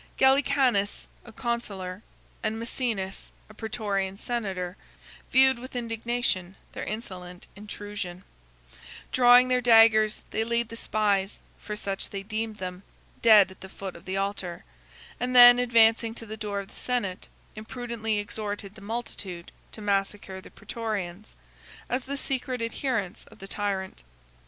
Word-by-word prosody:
Gallicanus, 265 -6 +3 0.2
a 230 - -11
consular, 205 -6 -3 0.4
and 215 - -1
Mæcenas, 225 -5 -3 0.2
a - - -13
Prætorian 205 -4 -2
senator, 195 -6 -3 0.6
viewed 265 -1 +6
with 255 +1 -10
indignation 230 -5 -1 0.2
their - - -6
insolent 180 -5 -6
intrusion: 205 -3 -7 0.9
drawing 245 0 +7
their 250 0 +2
daggers, 225 -2 +6
they 220 - 0
laid 235 0 0
the 230 - -7
spies 205 -3 0 0.2
(for 210 - -5
such 195 -2 -2
they 195 -1 -5
deemed 215 +1 -3
them) 180 -1 -6 0.4
dead 210 -4 +7
at 190 - -16
the 190 - -9
foot 190 -1 -7
of 170 +2 -13
the 190 +1 -2
altar, 195 -3 -3 0.5
and 250 +1 -1
then, 245 0 +10
advancing 230 -1 +4
to 230 - -8
the 220 0 -6
door 210 -2 -3
of 195 - -7
the - - -16
senate, 235 -8 -2 0.3
imprudently 225 0 -3
exhorted 205 -1 -4
the 210 - -14
multitude 200 -5 -6 0.2
to 220 - -9
massacre 195 -1 -1
the - - -13
Prætorians, 215 -4 -5 0.5
as 250 +1 -1
the 280 +1 -3
secret 260 -2 -2
adherents 230 -4 -2
of 220 - -17
the 195 - -9
tyrant. 195 - -3
215 Hz, 140 wpm, -27 LUFS, 195-235 Hz, 0.9 s, then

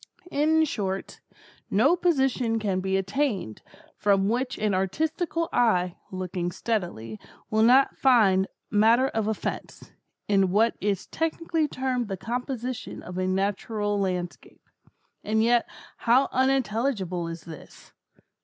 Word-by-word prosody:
In 315 +2 +3
short, 195 -8 -4 0.5
no 260 - +4
position 270 -9 +1
can 200 -4 -1
be 190 0 0
attained, 195 - -2 0.3
from 200 -1 +2
which 250 +3 -1
an 210 -1 0
artistical 320 - -1
eye, 180 -7 +2 0.2
looking 185 -1 -3
steadily, 175 - -3 0.3
will 215 0 +2
not 255 +4 +5
find 200 -8 +4 0.2
matter 230 +5 +4
of 220 -1 -2
offence, 220 - -5 0.4
in 195 -2 +3
what 220 +5 +2
is 200 -2 -1
technically 325 -1 -1
termed 255 -4 -2
the 195 -2 -4
composition 245 +3 -4
of 180 +1 -6
a 185 - 0
natural 205 +2 -1
landscape. 180 -2 -4 0.6
And 220 +1 +1
yet 235 0 +2 0.3
how 250 +4 +3
unintelligible 230 -8 0
is 165 0 -7
this! 160 -3 -13
215 Hz, 120 wpm, -26 LUFS, 190-260 Hz, 0.6 s, not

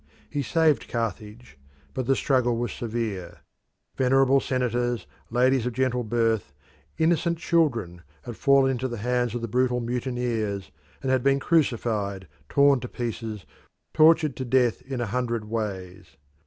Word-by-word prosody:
He 145 - -1
saved 155 +2 +2
Carthage, 115 - -5 0.3
but 130 -2 -3
the 135 - +4
struggle 125 -4 +1
was 120 +1 -2
severe. 110 -7 -4 0.5
Venerable 135 +1 +4
senators, 120 -2 -1 0.2
ladies 125 +1 +2
of 125 - -3
gentle 125 0 0
birth, 115 -8 0 0.4
innocent 170 +1 +2
children, 120 - 0 0.2
had 120 -2 -7
fallen 135 +1 +4
into 130 0 -2
the 120 -2 -5
hands 120 +1 -1
of 120 - -3
the - - -1
brutal 125 +2 +1
mutineers, 120 - -2 0.3
and 130 - 0
had 130 -1 +2
been 140 +1 +3
crucified, 110 - 0 0.2
torn 140 -1 +4
to 125 - -6
pieces, 115 -4 -5 0.5
tortured 155 -3 +5
to 130 - -3
death 125 -2 +2
in 130 -2 -5
a - - 0
hundred 120 0 -2
ways. 100 -8 -5
120 Hz, 140 wpm, -25 LUFS, 115-130 Hz, 0.5 s, tortured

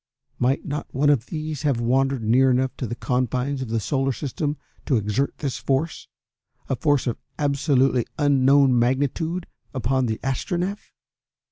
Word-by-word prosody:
Might 130 +3 +1
not 145 +1 -4
one 145 +2 +3
of 125 -5 +1
these 155 -2 -4
have 140 -5 +1
wandered 130 +1 +1
near 125 +5 +4
enough 130 +1 +1
to 125 - -3
the 120 - -4
confines 130 +3 -1
of 130 - -4
the 115 0 0
Solar 135 +5 0
System 145 +2 -3 0.3
to 130 - +3
exert 105 +6 -1
this 140 -4 -3
force, 140 +4 -1 0.6
a 135 - 0
force 145 +1 +1
of 120 -3 -2 0.2
absolutely 140 -4 +2
unknown 140 -2 +4
magnitude, 145 +8 0 0.3
upon 130 +1 +1
the 110 -1 -2
Astronef? 175 - -2
135 Hz, 150 wpm, -23 LUFS, 125-145 Hz, 0.6 s, near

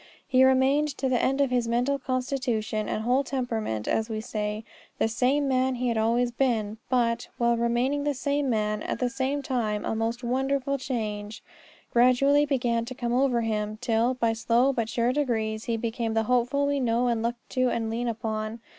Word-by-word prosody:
He 255 0 +4
remained 265 +3 +4
to 270 - -1
the 250 -2 +2
end 270 +2 +1
in 275 -2 +1
his 245 -2 +1
mental 245 +4 +1
constitution 250 -5 -2
and 215 - -2
whole 250 +4 +2
temperament, 225 - -3
as 220 +1 0
we 220 -1 -3
say, 215 -1 -3 0.3
the - - +2
same 260 +5 +1
man 260 0 +1
he 250 0 -1
had 230 - 0
always 235 +2 +2
been; 225 -4 0
but, 240 -2 +1
while 235 0 +2
remaining 240 +5 0
the 290 -1 0
same 280 +1 -1
man, 215 -2 0
at - - -3
the 250 -1 -1
same 270 +2 -2
time 225 -7 -1
a - - -1
most 230 +2 -2
wonderful 270 +2 0
change 215 -4 -4 0.5
gradually 275 +4 +4
began 240 -4 0
to 255 +2 -7
come 240 -1 -2
over 250 -2 +2
him, 215 -1 -2
till, 240 +1 +1
by 230 -2 +1
slow 235 +4 +2
but 230 -3 -2
sure 235 +2 +1
degrees, 220 -6 -1
he 230 -1 -1
became 225 0 -2
the 225 - +2
Hopeful 250 +4 +1
we 285 0 0
know 240 -1 +1
and 235 -2 +1
look 235 +1 -1
to 255 -1 +1
and 225 -2 -2
lean 240 +2 -2
upon. 220 0 -3
240 Hz, 190 wpm, -26 LUFS, 225-260 Hz, 0.5 s, He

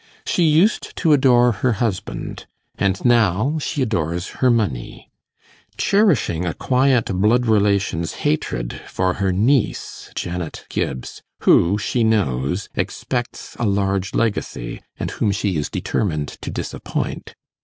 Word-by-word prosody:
She 175 - +2
used 160 +8 +2
to 160 - +3
adore 125 -3 +5
her 120 +2 0
husband, 105 -2 -3 0.3
and 100 +2 -1
now 120 - +3
she 145 -1 -1
adores 85 -6 -2
her 130 - +5
money, 105 - -1 0.7
cherishing 165 - +2
a 85 - -2
quiet 130 -2 +2
blood 110 +6 +3
relation's 100 -6 +1
hatred - - -1
for 95 0 0
her 95 -1 +2
niece, 115 +7 0
Janet 85 -2 -4
Gibbs, 65 - -4 0.2
who, 90 +5 +4
she 115 +3 0
knows, 90 - 0
expects 120 -2 -4
a 120 - +1
large 100 -1 0
legacy, 100 - -2 0.2
and - - -3
whom - - 0
she 100 -2 -1
is 75 -1 -1
determined 75 -8 -1
to - - -5
disappoint. - - -4
105 Hz, 125 wpm, -21 LUFS, 90-125 Hz, 0.7 s, adore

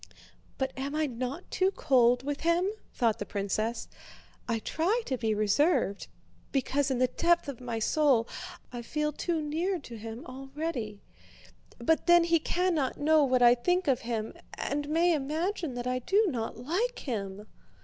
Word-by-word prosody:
"But 265 -1 -1
am 275 +2 -4
I 310 0 +2
not 255 +5 -5
too 375 0 +2
cold 250 -8 +3
with 285 +1 -3
him?" 335 +3 +2 0.2
thought 230 -4 +1
the - - -2
princess. 215 +3 -2 0.6
"I 230 -2 +1
try 355 - 0
to 265 - -1
be 225 -3 0
reserved 215 - +2 0.4
because 275 +1 +1
in 260 - 0
the 255 - +4
depth 340 +6 +2
of 270 -4 -6
my 240 -2 -3
soul 250 0 +3 0.5
I 240 - -4
feel 300 +5 -1
too 330 0 -1
near 335 +6 -1
to 240 -7 -9
him 225 +2 -7
already, 265 -5 -5 0.7
but 320 +8 +1
then 345 0 +7
he 335 0 +3
cannot 335 -5 0
know 310 +1 +4
what 255 -2 +3
I 240 0 +8
think 355 +8 0
of 265 -3 +3
him 225 -2 -3 0.2
and 290 +1 -2
may 335 +3 +3
imagine 315 +1 -2
that 245 0 -4
I 255 0 0
do 400 - +3
not 225 -5 -3
like 365 - -1
him." 205 -5 -4
270 Hz, 165 wpm, -29 LUFS, 240-325 Hz, 0.7 s, I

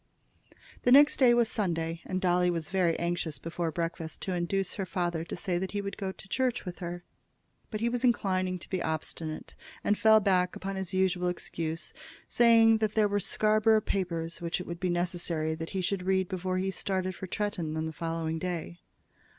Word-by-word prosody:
The 245 - +2
next 290 +3 +7
day 255 -3 +6
was 240 -1 +4
Sunday, 165 -6 -1
and 185 - -2
Dolly 180 -1 +3
was 165 -3 -2
very 180 -3 +2
anxious 170 -3 -2
before 165 +3 -3
breakfast 165 -1 -4
to 190 - -2
induce 180 +2 -1
her 195 - -3
father 175 -3 -1
to - - -6
say 175 -1 -1
that 190 +2 -4
he 205 - -1
would 200 0 -5
go 195 -2 -3
to 195 - -13
church 250 +4 0
with 180 -1 -6
her; 175 0 -5 0.7
but 215 -1 -4
he 230 - +2
was 245 +1 -1
inclined 185 -6 +1
to - - -11
be 185 -2 -1
obstinate, 160 0 -3 0.3
and 205 - +3
fell 220 0 +7
back 185 -3 +2
upon 195 +1 -4
his 190 -2 -4
usual 185 -1 +1
excuse, 165 -2 -3 0.3
saying 225 -1 +5
that 215 -1 0
there 215 -1 +4
were 205 0 0
Scarborough 215 +2 +3
papers 170 -5 -2
which 170 +1 -2
it 180 - -6
would 170 0 -6
be 185 - 0
necessary 175 -2 -1
that 165 +1 -5
he 190 - -2
should 190 +1 -1
read 190 0 +1
before 185 0 -2
he 190 +1 0
started 185 -1 -2
for 190 - -7
Tretton 175 -6 -2
on 160 - -1
the 160 - -4
following 165 0 -2
day. 175 -1 -4
180 Hz, 200 wpm, -29 LUFS, 170-200 Hz, 0.7 s, next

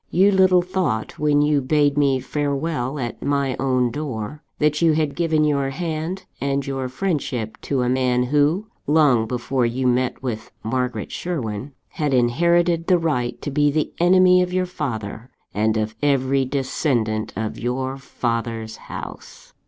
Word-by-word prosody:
You 195 +3 +4
little 185 -2 +5
thought, 175 - -2
when 145 -1 +3
you 150 -1 +2
bade 145 +1 +2
me 140 -2 +3
farewell 145 0 -2
at 120 -4 -4
my 140 -2 0
own 130 -2 +1
door, 135 -1 -5 0.2
that 150 0 +1
you 165 -2 +5
had 155 -2 0
given 160 -3 +2
your 140 -2 +1
hand 165 +4 -4 0.2
and 140 0 0
your 135 -2 -3
friendship 130 - -2
to 135 -3 -1
a - - 0
man, 125 -1 +2
who 150 +9 +2 0.2
long 145 -7 +4
before 125 +2 -1
you 120 +2 0
met 125 +1 +1
with 115 -4 -4
Margaret 125 +2 -2
Sherwin 135 -7 -4 0.2
had 145 -3 -1
inherited 170 +7 +2
the 185 - +5
right 145 -8 -1
to 145 - -3
be 145 +1 +3
the 150 +1 -1
enemy 180 +1 +6
of 180 0 -1
your 185 0 +1
father, 120 - -5 0.2
and 110 +1 +1
of 110 0 -2
every 135 -1 +2
descendant 125 -5 -1
of 110 0 -3
your 130 +2 -2
father's 115 -3 -3
house. - - -10
140 Hz, 155 wpm, -22 LUFS, 125-155 Hz, 0.2 s, enemy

